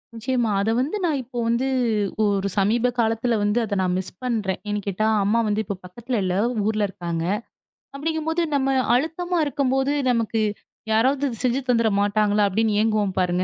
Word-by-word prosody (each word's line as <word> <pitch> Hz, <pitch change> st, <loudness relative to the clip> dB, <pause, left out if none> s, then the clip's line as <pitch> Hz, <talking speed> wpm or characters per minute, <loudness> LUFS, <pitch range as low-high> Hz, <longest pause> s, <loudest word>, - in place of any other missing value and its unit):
நிச்சயமா! 235 Hz, -1 st, 0 dB
அத 200 Hz, -, 0 dB
வந்து 290 Hz, +11 st, -1 dB
நான் 310 Hz, -5 st, +1 dB
இப்போ 245 Hz, 0 st, -6 dB
வந்து 235 Hz, +3 st, +1 dB, 0.6 s
ஒரு 200 Hz, -1 st, +1 dB
சமீப 225 Hz, +5 st, +2 dB
காலத்துல 225 Hz, +1 st, +1 dB
வந்து 205 Hz, +3 st, +2 dB
அதை 205 Hz, -2 st, -2 dB
நான் 180 Hz, -1 st, 0 dB
மிஸ் 185 Hz, -1 st, -5 dB
பண்றேன். 215 Hz, -7 st, -1 dB
ஏன்னு 205 Hz, 0 st, -1 dB
கேட்டா 205 Hz, +2 st, 0 dB, 0.2 s
அம்மா 215 Hz, +4 st, +2 dB
வந்து 210 Hz, +1 st, +1 dB
இப்போ 200 Hz, 0 st, -4 dB
பக்கத்துல 235 Hz, +5 st, -4 dB
இல்ல. 185 Hz, 0 st, 0 dB, 0.3 s
ஊர்ல 215 Hz, -1 st, +1 dB
இருக்காங்க. 170 Hz, -3 st, -4 dB, 0.7 s
அப்படிங்கும் 315 Hz, +2 st, -2 dB
போது 335 Hz, +2 st, 0 dB
நம்ம 270 Hz, -1 st, +1 dB, 0.2 s
அழுத்தமா 340 Hz, +6 st, -1 dB
இருக்கும்போது 270 Hz, -1 st, 0 dB, 0.2 s
நமக்கு 230 Hz, -2 st, +1 dB, 0.5 s
யாராவது 260 Hz, +6 st, +2 dB, 0.2 s
செஞ்சு 250 Hz, +2 st, +2 dB
தந்துட 230 Hz, -2 st, +3 dB
மாட்டாங்களா 205 Hz, 0 st, +2 dB
அப்படின்னு 210 Hz, +1 st, +1 dB
ஏங்குவோம் 215 Hz, -3 st, +1 dB
பாருங்க. 180 Hz, 0 st, +1 dB
225 Hz, 160 wpm, -23 LUFS, 205-260 Hz, 0.7 s, தந்துட